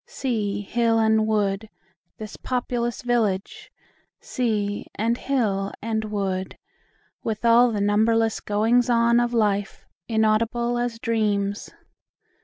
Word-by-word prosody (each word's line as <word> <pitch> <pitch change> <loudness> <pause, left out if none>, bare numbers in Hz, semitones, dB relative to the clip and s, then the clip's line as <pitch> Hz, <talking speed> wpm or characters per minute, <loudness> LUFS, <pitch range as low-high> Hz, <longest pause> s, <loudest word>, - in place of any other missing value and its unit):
Sea, 210 -6 -2
hill, 230 +2 +1
and 220 -1 +3
wood, 210 0 0 0.5
This 215 -1 -8
populous 245 -1 -3
village! 220 -6 -1 0.5
Sea, 210 -5 -2
and 230 +3 0
hill, 210 -8 -1
and 220 0 -2
wood, 195 -3 -3 0.7
With 220 +1 -3
all 235 +1 +5
the 210 -2 -2
numberless 220 +2 +2
goings 225 +4 +1
on 235 0 +4
of 240 0 0
life, 205 -4 -1 0.2
Inaudible 230 +2 +1
as 240 -1 -2
dreams! 210 -3 -1
220 Hz, 110 wpm, -24 LUFS, 205-235 Hz, 0.7 s, all